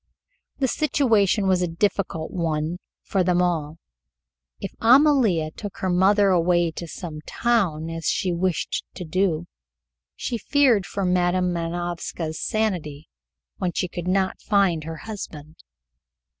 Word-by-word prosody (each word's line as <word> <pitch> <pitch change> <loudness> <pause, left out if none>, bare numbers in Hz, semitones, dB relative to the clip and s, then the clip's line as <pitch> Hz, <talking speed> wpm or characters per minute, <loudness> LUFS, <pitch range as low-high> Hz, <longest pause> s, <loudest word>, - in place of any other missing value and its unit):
The 265 - +1
situation 230 -9 +2
was 185 -1 +3
a 180 - +1
difficult 170 -2 -1
one 165 -1 -2 0.2
for 190 -2 0
them 180 0 +2
all. 165 -3 0 0.8
If 195 - -6
Amalia 235 - +4
took 205 +4 -8
her 185 - -1
mother 195 +3 +4
away 175 -1 +3
to 170 +1 -7
some 160 -2 -7
town, 190 -10 0
as 165 0 -4
she 180 -2 +1
wished 175 0 -1
to 180 - -6
do, 175 -1 0 0.7
she 235 - -3
feared 250 -7 +3
for 200 -1 -2
Madam 180 0 +2
Manovska's 170 -1 -3
sanity 175 -10 -2 0.5
when 180 -2 -2
she 180 - -1
could 175 0 -6
not 190 0 0
find 190 -7 +2
her 160 0 -6
husband. 160 -8 -8
180 Hz, 130 wpm, -24 LUFS, 165-200 Hz, 0.8 s, Amalia